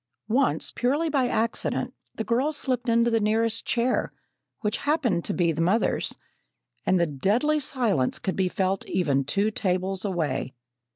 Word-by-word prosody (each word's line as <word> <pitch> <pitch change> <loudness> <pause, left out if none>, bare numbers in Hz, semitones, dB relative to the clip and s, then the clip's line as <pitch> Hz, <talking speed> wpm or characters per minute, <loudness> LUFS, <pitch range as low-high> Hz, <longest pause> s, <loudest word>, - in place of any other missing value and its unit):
Once, 260 +4 +1
purely 290 +7 0
by 270 -4 +2
accident, 230 -1 0 0.2
the 225 - -3
girl 250 +7 +1
slipped 255 -5 -2
into 235 +1 +3
the 225 - +3
nearest 225 +1 +1
chair, 245 +1 +1 0.5
which 210 -1 0
happened 250 - 0
to - - -3
be 175 -3 +1
the 160 +1 -2
mother's, 190 +7 +1 0.7
and 185 - +3
the 170 - +3
deadly 210 - +1
silence 230 - 0
could 190 - -3
be 190 -1 +1
felt 190 -1 -1
even 145 -7 +1
two 200 +10 0
tables 190 -2 0
away. 160 -9 -2
215 Hz, 155 wpm, -26 LUFS, 185-245 Hz, 0.7 s, into